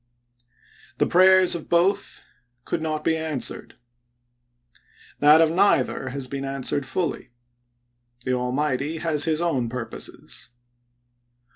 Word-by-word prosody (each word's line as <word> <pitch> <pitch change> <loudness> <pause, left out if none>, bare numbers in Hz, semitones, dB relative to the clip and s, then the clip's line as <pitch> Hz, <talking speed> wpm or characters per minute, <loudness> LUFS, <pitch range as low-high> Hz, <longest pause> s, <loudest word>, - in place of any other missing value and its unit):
The - - +2
prayers 185 0 +5
of 170 -2 -5
both 175 +4 0 0.4
could 165 - -3
not 155 -1 -3
be 160 - +1
answered 160 -4 -2 0.7
— 120 0 -30
that 150 +2 +6
of 160 -1 +3
neither 180 -7 +1
has 135 0 -5
been 135 +1 -5
answered 135 0 -2
fully. 165 -4 -3 1.0
The 130 - 0
Almighty 130 +4 -2
has 155 -2 +1
his 160 0 0
own 135 -9 -1
purposes. 115 -2 -5
150 Hz, 115 wpm, -23 LUFS, 130-165 Hz, 1.0 s, that